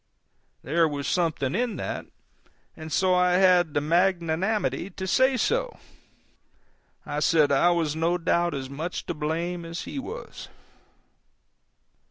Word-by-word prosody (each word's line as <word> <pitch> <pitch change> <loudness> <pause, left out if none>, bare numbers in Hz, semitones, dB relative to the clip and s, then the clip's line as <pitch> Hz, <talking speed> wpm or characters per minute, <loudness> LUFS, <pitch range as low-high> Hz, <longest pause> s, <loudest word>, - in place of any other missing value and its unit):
There 165 +5 +2
was 145 -2 -4
something 155 -6 0
in 240 +3 -1
that, - - -5 0.7
and 160 -1 -9
so 185 +4 +2
I 180 0 +3
had 180 -4 +4
the 145 - +2
magnanimity 175 0 0
to 190 0 -6
say 260 +7 +3
so. - - -1 1.3
I 145 - -3
said 155 -2 +3
I 140 +5 +4
was 165 -4 0
no 165 +2 +1
doubt 170 -1 0
as 135 -1 -4
much 155 +6 -5
to - - -3
blame 165 +3 -3
as 165 0 -6
he 280 - -6
was. 440 - -8
170 Hz, 135 wpm, -26 LUFS, 155-185 Hz, 1.3 s, had